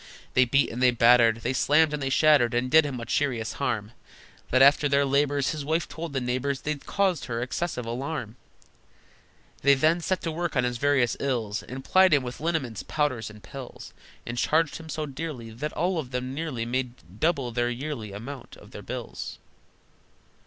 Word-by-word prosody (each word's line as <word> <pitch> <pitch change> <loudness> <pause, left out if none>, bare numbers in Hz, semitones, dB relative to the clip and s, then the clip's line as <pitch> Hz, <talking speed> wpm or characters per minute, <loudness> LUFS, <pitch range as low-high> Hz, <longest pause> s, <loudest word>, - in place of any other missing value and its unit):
They 130 - +5
beat 140 +4 +2
and 120 - -5
they 125 - +6
battered, 115 -1 +5
They 125 - -1
slammed 150 +3 +3
and 150 - -3
they 135 - -1
shattered, 135 -4 +4
And 125 +1 0
did 160 0 +6
him 135 -3 -4
such 115 0 -3
serious 125 -6 -1
harm, 105 0 -1 0.6
That, 130 +1 +5
after 145 +1 +5
their 140 0 +3
labors, 140 0 +1
His 155 -2 -4
wife 160 +3 0
told 160 +2 -6
the 135 - 0
neighbors 130 +2 -2
They'd 150 -2 -4
caused 190 -6 +1
her 115 -2 -3
excessive 125 +1 -3
alarm! 120 -1 -4 1.3
They 140 +1 +5
then 160 +5 +2
set 185 +2 -1
to 165 - -2
work 170 0 -3
on 130 - +3
his 125 -1 -2
various 140 -4 +2
ills, 115 -6 -1
And 130 +1 -8
plied 185 -4 +5
him 140 - +1
with 125 -1 -6
liniments, 145 - -2
powders, 130 -3 -1
and 105 -1 -14
pills, 135 -2 -10 0.3
And 120 +1 -4
charged 160 -1 +2
him 160 -1 -11
so 155 0 -3
dearly 140 -5 -6
That 145 +7 -4
all 175 +1 0
of 135 -5 -5
them 125 0 -3
nearly 140 -6 -3
Made 120 -5 -5
double 140 -7 +1
the 120 +1 0
yearly 120 -4 -5
amount 120 +6 -8
of - - -16
their - - -8
bills. - - -6
135 Hz, 190 wpm, -26 LUFS, 120-150 Hz, 1.3 s, they